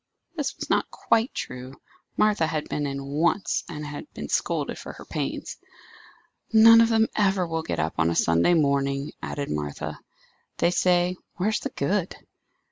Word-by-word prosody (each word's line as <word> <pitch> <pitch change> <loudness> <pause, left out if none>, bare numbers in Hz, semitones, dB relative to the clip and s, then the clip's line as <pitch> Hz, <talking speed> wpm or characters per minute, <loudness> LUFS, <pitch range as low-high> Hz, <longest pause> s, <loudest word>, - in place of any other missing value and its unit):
This 290 -4 -3
was - - -5
not - - +1
quite 230 +2 +1
true. 125 +1 -7 0.4
Martha 210 -6 +3
had 155 -2 -3
been 145 -1 -2
in 140 0 -4
once, 160 +7 0
and 150 -3 -6
had 145 - -8
been - - -6
scolded - - -1
for - - -8
her - - -12
pains. - - -4 0.9
"None 230 +1 +8
of 230 - +4
them 225 -1 +4
ever 195 -3 +2
will 165 -1 -2
get 160 - -4
up 80 +1 -1
on 80 0 +3
a 85 - -1
Sunday 85 - +3
morning," 140 -2 +1
added 145 -1 -4
Martha; 75 -1 -4 0.6
"they 170 - +2
say, 180 0 +2 0.2
'where's 210 +4 0
the - - -4
good? 185 +5 -1
165 Hz, 165 wpm, -25 LUFS, 140-205 Hz, 0.9 s, None